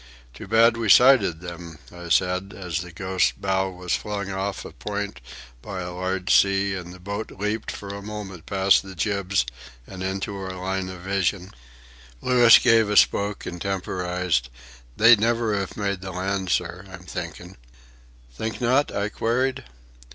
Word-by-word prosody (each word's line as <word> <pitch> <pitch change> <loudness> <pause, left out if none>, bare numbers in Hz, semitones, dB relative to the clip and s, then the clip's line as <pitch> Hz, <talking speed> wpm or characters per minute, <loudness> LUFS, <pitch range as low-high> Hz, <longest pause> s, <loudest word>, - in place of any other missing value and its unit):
"Too - - -10
bad 115 +2 +4
we 115 -2 -1
sighted 105 -10 +6
them," 85 -2 -8 0.2
I 85 0 -9
said, 90 +3 +1
as 90 -4 -3
the 90 -1 -9
Ghost's 95 +2 0
bow 95 0 -1
was 90 -1 -2
flung 100 -2 -4
off 95 0 -3
a - - -8
point 105 -3 -5 0.4
by 95 +5 -6
a 90 0 -5
large 95 +1 -1
sea 100 0 +3
and 90 -2 -6
the 90 - -12
boat 100 +4 -5
leaped 105 +3 -3
for 100 - -7
a 100 - -7
moment 100 -5 -8
past 95 0 +4
the 95 -1 -11
jibs 100 -3 0 0.4
and 95 +5 -9
into 95 +2 -3
our 95 -1 -6
line 95 0 -3
of 90 -1 -9
vision. 95 0 -1 0.7
Louis 120 - +7
gave 115 -3 +4
a 105 - +1
spoke 100 0 +3
and 90 -1 -6
temporized. 90 -7 -1 0.5
"They'd 115 0 +7
never 115 0 +1
iv 100 -2 -3
made 100 -3 -2
the 95 - -6
land, 95 +1 -2
sir, 90 +1 -1
I'm 95 -1 -11
thinkin'." 90 - -7 0.8
"Think 110 - -4
not?" 130 +4 +2
I 100 +1 -2
queried. 125 - -1
95 Hz, 165 wpm, -24 LUFS, 90-105 Hz, 0.8 s, Louis